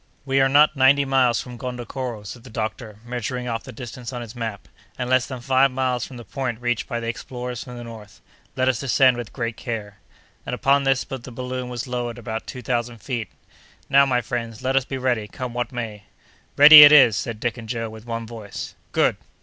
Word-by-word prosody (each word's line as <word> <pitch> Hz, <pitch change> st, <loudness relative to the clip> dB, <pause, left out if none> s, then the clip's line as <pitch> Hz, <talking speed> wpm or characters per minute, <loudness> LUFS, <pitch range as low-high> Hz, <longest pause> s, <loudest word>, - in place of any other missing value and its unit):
"We 135 Hz, 0 st, +2 dB
are 135 Hz, -, +4 dB
not 150 Hz, +2 st, +5 dB
ninety 140 Hz, +1 st, +4 dB
miles 130 Hz, -3 st, +2 dB
from 125 Hz, -1 st, -8 dB
Gondokoro," 125 Hz, -2 st, -5 dB
said 115 Hz, +3 st, -9 dB
the 130 Hz, -, -12 dB
doctor, 110 Hz, -1 st, -5 dB
measuring 125 Hz, +1 st, -4 dB
off 115 Hz, -1 st, -3 dB
the -, -, -8 dB
distance 120 Hz, +1 st, -8 dB
on 120 Hz, -2 st, -5 dB
his 115 Hz, +1 st, -11 dB
map, 110 Hz, -4 st, -5 dB, 0.3 s
"and 125 Hz, -, -3 dB
less 130 Hz, 0 st, +2 dB
than 130 Hz, -3 st, -7 dB
five 135 Hz, +2 st, +3 dB
miles 125 Hz, -2 st, -1 dB
from 130 Hz, -, -11 dB
the 120 Hz, -, -10 dB
point 130 Hz, -4 st, -4 dB
reached 120 Hz, -1 st, -1 dB
by 120 Hz, -3 st, -3 dB
the 115 Hz, -, -5 dB
explorers 125 Hz, +1 st, -5 dB
from 125 Hz, -2 st, -10 dB
the 120 Hz, -, -7 dB
north. 110 Hz, -4 st, -11 dB, 0.4 s
Let 130 Hz, 0 st, +1 dB
us 130 Hz, -3 st, +1 dB
descend 130 Hz, -1 st, +4 dB
with 120 Hz, -2 st, -6 dB
great 115 Hz, -3 st, -4 dB
care." 105 Hz, -4 st, -6 dB, 0.4 s
And, -, -, -4 dB
upon 140 Hz, +1 st, +2 dB
this, 135 Hz, -1 st, +2 dB
the 130 Hz, -1 st, -8 dB
balloon 125 Hz, +1 st, -5 dB
was 120 Hz, -1 st, -4 dB
lowered 120 Hz, -2 st, -4 dB
about 110 Hz, -1 st, -6 dB
two 125 Hz, -, -8 dB
thousand 120 Hz, 0 st, -2 dB
feet. 115 Hz, -1 st, -4 dB, 0.6 s
"Now, 140 Hz, 0 st, +6 dB
my 125 Hz, -2 st, +1 dB
friends, 115 Hz, -1 st, -5 dB
let 130 Hz, +1 st, 0 dB
us 135 Hz, -2 st, +2 dB
be 135 Hz, -, -5 dB
ready, 125 Hz, -5 st, -1 dB
come 125 Hz, +4 st, -6 dB
what 120 Hz, +2 st, -3 dB
may." 110 Hz, -4 st, -6 dB, 0.5 s
"Ready 150 Hz, +1 st, +12 dB
it 145 Hz, 0 st, +11 dB
is!" 135 Hz, -7 st, +7 dB
said 110 Hz, +1 st, -4 dB
Dick 120 Hz, 0 st, -1 dB
and 110 Hz, -1 st, -10 dB
Joe, 115 Hz, -1 st, -2 dB
with 110 Hz, +1 st, -12 dB
one 115 Hz, -1 st, -4 dB
voice. 110 Hz, -3 st, -8 dB, 0.2 s
"Good!" -, -, +2 dB
125 Hz, 215 wpm, -23 LUFS, 115-130 Hz, 0.6 s, Ready